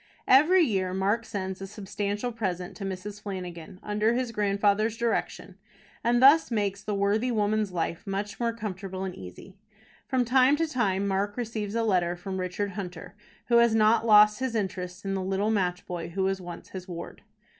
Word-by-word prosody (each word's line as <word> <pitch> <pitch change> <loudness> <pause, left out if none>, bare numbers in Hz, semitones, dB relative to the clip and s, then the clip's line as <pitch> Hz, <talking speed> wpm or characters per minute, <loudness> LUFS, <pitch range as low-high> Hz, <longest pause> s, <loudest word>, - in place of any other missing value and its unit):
Every 325 +8 +6
year 190 - 0
Mark 205 +5 0
sends 190 -3 -4
a 195 - -5
substantial 205 +3 -3
present 185 -6 -4
to 200 - -7
Mrs. 195 +2 -6
Flanagan, 185 -3 -7
under 210 +2 +1
his 250 -1 -1
grandfather's 210 +1 +1
direction, 235 -1 -2 0.4
and 240 +1 +3
thus 280 +5 +6
makes 205 -4 -1
the 210 - -3
worthy 205 +5 +1
woman's 215 -2 0
life 170 +1 -3
much 200 +1 -4
more 235 -1 +1
comfortable 195 -4 -5
and 190 -1 -4
easy. 95 - -11 0.5
From 255 -2 +1
time 260 +3 +4
to 330 +2 0
time 200 -10 0
Mark 200 +2 -1
receives 220 -3 -3
a 230 - +1
letter 180 -5 +1
from 190 +1 -5
Richard 185 +2 -2
Hunter, 180 -2 -7 0.3
who 235 - +4
has 235 -1 +5
not 220 +1 +4
lost 210 -1 +6
his 260 -3 -2
interest 185 -2 -4
in 195 - -1
the 190 - -1
little 195 +3 0
match 180 -4 -1
boy 170 -2 -5
who 190 +3 -2
was 190 0 0
once 175 -1 -9
his 185 -1 -8
ward. 170 -2 -8
205 Hz, 180 wpm, -27 LUFS, 190-225 Hz, 0.5 s, Every